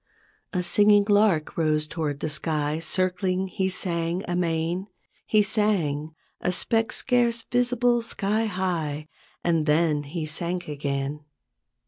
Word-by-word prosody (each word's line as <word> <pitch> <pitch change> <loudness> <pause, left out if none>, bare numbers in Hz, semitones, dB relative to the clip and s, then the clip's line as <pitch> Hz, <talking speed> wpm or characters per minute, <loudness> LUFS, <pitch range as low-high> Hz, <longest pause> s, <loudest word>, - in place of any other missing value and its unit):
A 180 -2 -1
singing 205 +2 +5
lark 205 -7 +3
rose 155 -2 +1
toward 150 -4 -3
the 155 - -1
sky, 150 0 -1
Circling 185 +2 0
he 190 0 -1
sang 175 -1 -2
amain; 175 +1 -1 0.4
He 215 -1 +4
sang, 170 -8 0 0.2
a 180 - 0
speck 225 +4 0
scarce 240 -3 +1
visible 245 -1 +2
sky 215 0 -1
high, 165 -7 -2 0.3
And 165 -3 +1
then 150 -1 +3
he 155 +3 -4
sank 170 +3 -3
again. 140 0 -3
175 Hz, 120 wpm, -25 LUFS, 155-205 Hz, 0.4 s, singing